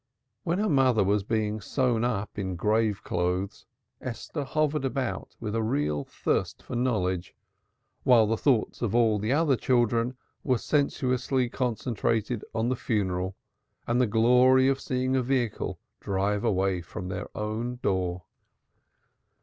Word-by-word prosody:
When 175 -1 -1
her 215 +2 +1
mother 130 - +4
was 100 +2 +2
being 110 0 -1
tied 120 +1 0
up 105 -4 -2
in 95 -2 -2
grave 105 +2 +1
clothes, 90 +2 -2 0.3
Esther 130 +4 -5
hovered 150 +1 0
about 135 -2 -3
with 105 -2 -4
a 115 - 0
real 75 -9 0
thirst - - -2
for - - -6
knowledge 95 -8 -1 0.7
while 120 -4 +5
the 110 +2 +1
thoughts 125 -1 +1
of 115 -2 0
all 115 -3 +3
the 105 +4 -1
other 145 -1 +3
children 120 0 +1 0.3
were 130 -3 +2
sensuously 130 -2 0
concentrated 115 -2 -1
on 115 +1 +1
the 130 - +1
funeral 95 -5 -1 0.5
and 120 +2 +2
the 125 - +3
glory 125 +4 +5
of 135 0 +1
seeing 130 0 -1
a 130 - +3
vehicle 125 -3 -1 0.2
drive 100 +2 -1
away 95 -4 +1
from 90 +2 -7
their - - -4
own 110 +3 -2
door. 90 -2 0
115 Hz, 140 wpm, -27 LUFS, 100-130 Hz, 0.7 s, while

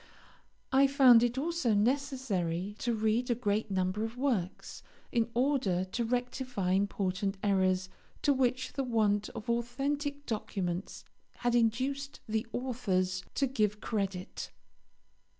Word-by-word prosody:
I 270 +1 +6
found 265 -4 +7
it 240 +1 +1
also 290 -6 +1
necessary 210 - 0
to 235 -1 0
read 220 +3 +1
a 240 - +3
great 215 -2 -1
number 190 +2 0
of 225 +2 -4
works, 235 -10 -2 0.3
in 230 -1 +1
order 245 -9 +1
to 215 +6 -2
rectify 245 -4 -1
important 195 0 0
errors 185 -2 +2 0.4
to 285 - +4
which 255 -1 0
the 275 - -1
want 215 -4 +1
of 220 - -7
authentic 280 +5 -1
documents 190 -5 -3 0.3
had 240 -1 0
induced 260 +5 0
the 220 +1 -1
authors 190 -8 -1
to 275 - +2
give 215 -5 0
credit. 195 -4 -3
230 Hz, 125 wpm, -31 LUFS, 195-260 Hz, 0.4 s, found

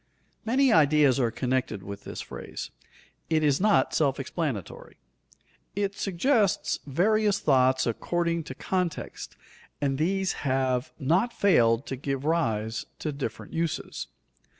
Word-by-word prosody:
_ - - -43 0.4
Many 260 +1 +4
ideas 145 -3 +4
are 120 -3 +2
connected 125 -4 -2
with 100 +1 -8
this - - -6
phrase. - - -7 0.6
It 160 -1 +2
is 145 +1 +2
not 210 0 +3
self 140 -4 +1
explanatory. 135 - -4 0.8
It 200 0 -1
suggests 205 +2 +1
various 205 +7 +2
thoughts 130 -2 +3
according 170 +7 -1
to 130 - -7
context 180 0 -3 0.4
and 135 -1 -1
these 190 +3 +1
have 130 -1 0
not 170 - +2
failed 120 - +3
to 135 - -4
give 135 +1 -3
rise 115 -9 0
to 155 - -3
different 140 +3 -6
uses. 165 -1 -3
150 Hz, 125 wpm, -27 LUFS, 130-185 Hz, 0.8 s, Many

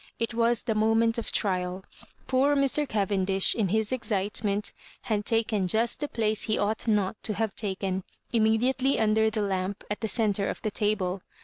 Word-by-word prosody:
It 230 +1 -2
was 235 0 +1
the 230 - 0
moment 225 +2 +2
of 230 - -4
trial 185 -1 -1 0.4
'♦Poor 275 +3 +2
Mr. 275 +1 +2
Caven 200 -2 0
dish, 190 0 +2
in 220 -4 0
his 220 +3 0
excitement, 205 -3 -1 0.3
had 210 -2 -1
taken 220 -4 +1
just 225 +5 +2
the 295 - -1
place 220 -4 0
he 215 - 0
ought 215 +3 -1
not 210 -2 0
to 215 - -2
have 220 -1 -2
taken, 190 -2 -2 0.3
immediately 240 +4 +2
under 220 0 +3
the 215 -1 -2
lamp 190 0 -2
at 210 - -3
the 220 - -1
centre 205 -3 +1
of - - -4
the 215 - -1
table. 195 -3 -1
215 Hz, 180 wpm, -27 LUFS, 200-230 Hz, 0.4 s, under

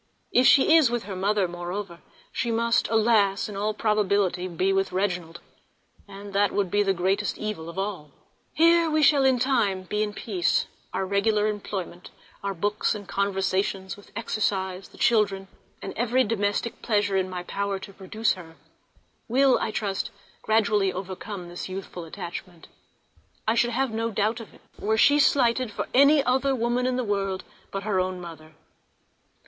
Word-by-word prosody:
If 250 +1 +5
she 290 +3 +6
is 310 -7 +6
with 240 -1 -2
her 195 0 -6
mother, 200 +1 +1
moreover, 175 +1 -6 0.3
she 235 - -2
must, 230 +1 +1
alas! 215 -3 +3
in 210 - -8
all 210 +2 -1
probability 200 -4 +1
be 185 +2 0
with 195 0 0
Reginald, 180 -3 -2 0.7
and 200 0 -10
that 200 0 +3
would 195 -4 -1
be 205 - +3
the 195 -1 +2
greatest 190 +3 0
evil 210 -7 -5
of 170 - -10
all. 195 -6 -4 0.5
Here 335 0 +5
we 310 0 +2
shall 285 -1 +5
in 265 -1 +4
time 235 -7 +1
be 210 +3 -2
in 210 -1 -1
peace, 185 -6 +1
and - - -19 0.2
our 190 - -1
regular 205 +2 +1
employments, 195 -4 -4 0.3
our 200 -1 -2
books 205 +5 0
and 205 -2 -8
conversations, 195 -1 -1
with 205 - -17
exercise, 190 -4 -2
the - - -18
children, 200 -4 +2 0.4
and - - -5
every 245 +2 +2
domestic 205 +1 -1
pleasure 205 -3 +1
in 190 -1 +1
my 180 -1 -5
power 200 +1 -2
to 195 +1 -10
procure 205 +4 -10
her, 165 -3 -12 0.7
will, 265 +2 +4
I - - -1
trust, 200 -2 -2 0.3
gradually 210 -3 +2
overcome 185 0 -6
this 175 +2 -7
youthful 185 -2 -7
attachment. 170 +1 -8 0.8
I 220 - +4
should 240 +1 +2
not 265 -1 0
have - - -9
a 225 +1 -1
doubt 215 +2 0
of 225 - -10
it - - -20 0.2
were 220 +1 0
she 285 +5 +5
slighted 255 -3 +3
for - - -4
any 280 +2 +6
other 265 +2 +1
woman 240 +1 0
in 255 - 0
the 255 - -1
world 195 -3 -2 0.3
than 195 0 -4
her 200 -3 0
own 185 0 -1
mother. 160 -3 -10
205 Hz, 175 wpm, -25 LUFS, 190-230 Hz, 0.8 s, she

